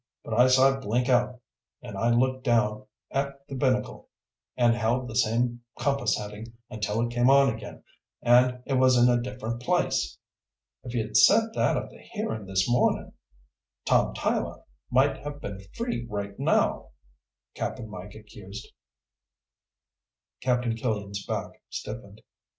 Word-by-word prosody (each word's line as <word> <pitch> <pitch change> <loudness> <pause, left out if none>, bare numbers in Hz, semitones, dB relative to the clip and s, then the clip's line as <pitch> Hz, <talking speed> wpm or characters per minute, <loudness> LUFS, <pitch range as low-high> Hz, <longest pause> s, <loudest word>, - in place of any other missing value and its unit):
But - - -5
I 125 +3 +6
saw 130 +1 +5
it 135 - -8
blink 120 +4 0
out, 125 0 +2 0.4
and - - -8
I 115 - +1
looked 130 +2 +2
down 110 -4 +1 0.2
at 140 0 -3
the - - -8
binnacle 130 -1 -1 0.5
and 120 -2 +4
held 120 +2 0
the 115 - -7
same 120 +1 +1 0.2
compass 140 +2 +1
heading 105 +2 -8 0.2
until 105 +1 -1
it 120 0 -1
came 120 +1 +3
on 135 -2 +5
again, 110 -2 -10 0.4
and 125 +1 +4
it 135 -2 +1
was 130 -1 +5
in 120 +1 +6
a 120 0 +3
different 120 -2 -5
place. - - 0 0.7
"If 125 -1 -7
you'd 110 -2 0
said 225 0 +5
that - - +2
at - - -4
the - - -15
hearing 205 - -5
this 95 -1 +1
morning, 120 0 +1 0.7
Tom - - +2
Tyler - - -2 0.3
might 130 +3 +3
have 145 0 -7
been 100 -9 -6
free 230 - -3
right 100 -1 -4
now," - - +1 0.6
Cap'n 115 -3 -4
Mike 100 -1 -9
accused. 105 0 -10 1.7
Captain 125 -2 +1
Killian's 105 -4 -3
back - - -4
stiffened. - - -7
120 Hz, 145 wpm, -27 LUFS, 110-130 Hz, 1.7 s, I